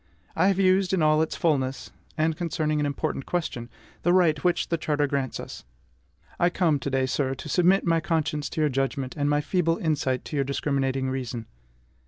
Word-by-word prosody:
I 175 +4 +3
have 195 -2 +2
used, 190 0 +3
in 180 -4 +2
all 155 0 +4
its 160 - -1
fulness, 135 -5 -1 0.3
and 160 +1 +1
concerning 155 -3 -1
an 145 - +1
important 145 -1 -3
question, 155 -9 -3 0.3
the 175 - +2
right 165 -5 +3
which 180 -1 +1
the 170 - +1
charter 145 -2 +1
grants 135 -2 -2
us. - - -8 0.8
I 175 - +4
come 170 -5 +1
to 140 - -3
day, 135 -1 +1
sir, 135 0 -1
to 135 - -9
submit 180 +6 +3
my 165 -1 +3
conscience 155 -2 -1
to 160 - -3
your 150 - +3
judgment, 135 0 -2
and 145 -1 0
my 145 0 +2
feeble 165 0 +1
insight 135 -5 -1
to - - -6
your 140 - +2
discriminating 135 -1 -1
reason. 125 -3 -4
150 Hz, 195 wpm, -26 LUFS, 135-165 Hz, 0.8 s, all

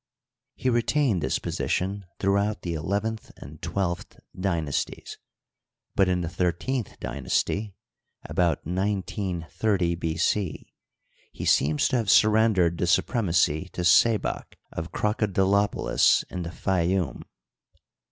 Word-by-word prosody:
He - - -3
retained 120 - +2
this - - 0
position 100 +2 -2
throughout 100 +2 +1
the 85 - -2
elev 90 +6 -1
enth 110 0 -4
and 75 +2 -12
twelfth 90 -3 -3 0.2
dynasties, 85 -7 -2 0.8
but 95 -1 +3
in 90 -1 +1
the 85 - -2
thirteenth 90 +8 -2
dynasty 95 - -2 0.5
(about 85 -4 0
1930 95 0 -1
B. 80 -1 -3
C.) 90 0 -1 0.6
he - - -6
seems 75 +1 +3
to 130 - +1
have 110 -4 -1
surrendered 105 -6 +4
the 90 - +1
su 85 - +4
premacy 90 - 0
to - - -3
Sebak, 110 +5 +3 0.2
of 80 +1 -5
Crocodilopolis 100 -1 +2
in 90 - -4
the 85 - -4
Fayoum. 90 +1 -1
95 Hz, 115 wpm, -26 LUFS, 85-105 Hz, 0.8 s, surrendered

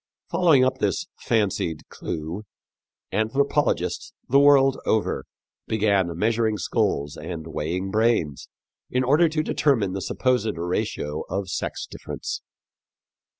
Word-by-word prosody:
Following 155 -8 +5
up 130 - 0
this - - 0
fancied 95 -7 0
clew, 80 +6 -5 0.7
anthropologists 135 +8 0
the 140 - +5
world 135 -1 +5
over 110 - 0 0.4
began 100 -6 +1
measuring 110 +1 +1
skulls 75 -4 0
and 80 -2 -6
weighing 85 +4 -3
brains 110 - +1 0.4
in 125 +1 +1
order 150 +6 +4
to 155 0 0
determine 115 -12 +1
the 95 - -3
supposed 125 -5 0
ratio 85 -3 -2
of 95 +1 -2
sex - - -3
difference. - - -6
110 Hz, 110 wpm, -24 LUFS, 90-130 Hz, 0.7 s, Following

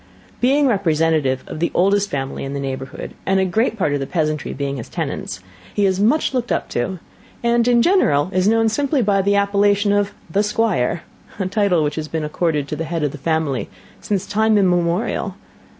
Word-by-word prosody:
Being 280 +4 +3
representative 160 - +1
of - - -7
the 170 - +1
oldest 200 +2 +3
family 135 -1 -3
in 135 0 -4
the 140 - -3
neighbourhood, 135 -1 -5
and 190 0 +2
a 190 - +2
great 225 +5 0
part 155 -8 +1
of 145 - 0
the 135 - -3
peasantry 155 -4 -1
being 140 0 -3
his 120 - -7
tenants, 95 0 -4 0.3
he 205 - +2
is 190 -1 +1
much 275 +9 +2
looked 250 -2 -1
up - - -1
to, 185 +11 -2 0.5
and, 235 0 +2
in 240 -1 +4
general, 180 - +3
is 185 +1 +2
known 225 +1 +3
simply 275 +3 +1
by 200 -1 +2
the 200 +1 +2
appellation 200 0 +2
of 205 0 0 0.2
'The 200 - +2
Squire;' 210 - 0 0.3
a 195 - -2
title 185 -4 +2
which 150 +1 -2
has 155 -1 -3
been 160 0 -3
accorded 150 -1 -1
to - - -2
the 165 +2 -3
head 165 -1 -2
of 145 - 0
the 150 - -9
family 160 -3 -1 0.3
since 200 -2 -1
time 220 +1 +2
immemorial. 180 +1 +1
185 Hz, 200 wpm, -20 LUFS, 150-210 Hz, 0.5 s, in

